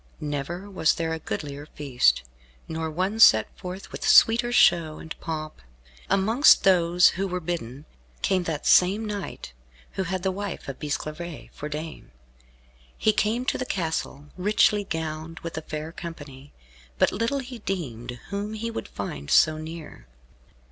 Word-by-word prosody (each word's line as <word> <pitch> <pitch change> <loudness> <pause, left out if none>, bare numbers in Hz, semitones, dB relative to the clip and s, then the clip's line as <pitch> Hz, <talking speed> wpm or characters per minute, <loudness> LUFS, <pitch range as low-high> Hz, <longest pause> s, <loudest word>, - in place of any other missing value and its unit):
Never 150 +5 -4
was 185 -6 +2
there 165 -1 -2
a 160 - -3
goodlier 145 -1 -5
feast, 125 - +2 0.4
nor 160 0 -3
one 185 +7 -2
set 110 - +6
forth 185 +1 -8
with - - -7
sweeter 240 +1 +6
show 165 -9 +4
and 160 - -8
pomp. 155 - -5 0.5
Amongst 220 +9 +5
those 180 -1 +5
who 195 +1 -2
were 180 -1 -2
bidden, 155 -5 -5 0.4
came 185 -2 +1
that 160 -3 -3
same 195 +5 +4
knight 200 - -6 0.4
who 190 - -3
had 185 0 -3
the 190 - +1
wife 200 0 -5
of 140 - -6
Bisclavaret 155 +2 -5
for 150 - -6
dame. 155 +2 -7 0.9
He 215 - +3
came 225 +4 0
to - - 0
the - - 0
castle, 160 - -3
richly 205 +2 +3
gowned, 160 -2 -5
with 165 - -6
a 160 - -3
fair 155 0 -6
company, 145 -5 -9 0.5
but - - +3
little 230 +7 -1
he 250 -3 -6
deemed 125 - -5
whom 205 +2 -3
he 230 +2 -4
would - - -5
find 70 +1 -6
so 155 0 +5
near. 155 - -9
170 Hz, 155 wpm, -25 LUFS, 150-195 Hz, 0.9 s, set